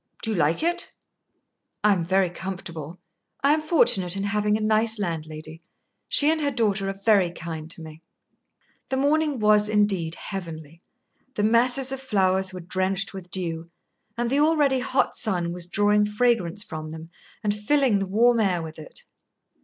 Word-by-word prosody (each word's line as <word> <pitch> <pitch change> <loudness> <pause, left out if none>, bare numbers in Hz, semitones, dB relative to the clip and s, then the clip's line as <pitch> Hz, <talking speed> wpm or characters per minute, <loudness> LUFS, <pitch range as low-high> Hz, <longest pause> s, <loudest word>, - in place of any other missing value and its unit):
"Do 225 - -1
you - - -1
like 165 - +1
it?" 345 +1 -1 0.9
"I 210 -1 +5
am 180 -3 -1
very 185 +1 +1
comfortable. 175 -3 -7 0.4
I 280 +1 +5
am 310 - 0
fortunate 255 - +2
in 195 - -2
having 210 +1 +1
a - - -6
nice 220 +1 +2
landlady. 160 -3 -5 0.5
She 295 +1 +4
and 320 -1 0
her 290 - +1
daughter 210 -6 0
are 195 0 -6
very 200 -6 +4
kind 165 -2 -7
to 165 0 -3
me." 160 0 -11 0.9
The 265 - -1
morning 295 +1 +1
was 210 -1 +4
indeed 195 -6 +1
heavenly. 165 -4 -8 0.5
The 205 - -1
masses 245 +4 +3
of 270 0 -5
flowers 190 -6 +1
were 185 -1 -8
drenched 190 +3 -1
with 185 -2 -8
dew, 170 -2 -4 0.5
and 240 0 -1
the 280 - +2
already 295 -3 +3
hot 260 +1 0
sun 180 -6 -1
was 175 -1 -4
drawing 205 +2 +2
fragrance 210 -4 +1
from 155 -4 -7
them 160 +1 -9 0.3
and 205 -1 +1
filling 220 +1 +2
the 195 - -2
warm 235 +4 +3
air 185 -6 +1
with 160 0 -9
it. 155 - -10
200 Hz, 170 wpm, -24 LUFS, 170-235 Hz, 0.9 s, I